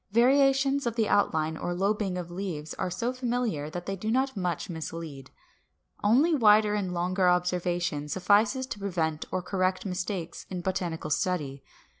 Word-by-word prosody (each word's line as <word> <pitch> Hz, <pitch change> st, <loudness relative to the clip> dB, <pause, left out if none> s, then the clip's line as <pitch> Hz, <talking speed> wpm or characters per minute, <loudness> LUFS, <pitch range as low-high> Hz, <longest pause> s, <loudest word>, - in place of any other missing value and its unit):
Variations 270 Hz, +2 st, +4 dB
of 230 Hz, -, -2 dB
the 225 Hz, -2 st, +1 dB
outline 160 Hz, -6 st, +1 dB
or 175 Hz, +2 st, -3 dB
lobing 195 Hz, 0 st, 0 dB
of 175 Hz, -1 st, -6 dB
leaves 175 Hz, -5 st, -4 dB
are -, -, -2 dB
so 235 Hz, +7 st, -2 dB
familiar 240 Hz, -, -2 dB
that 175 Hz, +2 st, -6 dB
they 195 Hz, -, -2 dB
do 215 Hz, +3 st, -4 dB
not 265 Hz, +3 st, +1 dB
much 180 Hz, -4 st, -2 dB
mislead. 160 Hz, -4 st, -6 dB, 0.7 s
Only 265 Hz, +11 st, +4 dB
wider 215 Hz, -5 st, +5 dB
and 200 Hz, -3 st, -1 dB
longer 180 Hz, +1 st, +1 dB
observation 175 Hz, -4 st, 0 dB
suffices 205 Hz, -, +2 dB
to 230 Hz, -, -7 dB
prevent 165 Hz, -6 st, -1 dB
or 185 Hz, -1 st, -1 dB
correct 185 Hz, 0 st, 0 dB
mistakes 180 Hz, -2 st, -4 dB
in 180 Hz, -2 st, -4 dB
botanical 175 Hz, -4 st, -3 dB
study. 145 Hz, -5 st, -1 dB
185 Hz, 155 wpm, -28 LUFS, 175-215 Hz, 0.7 s, wider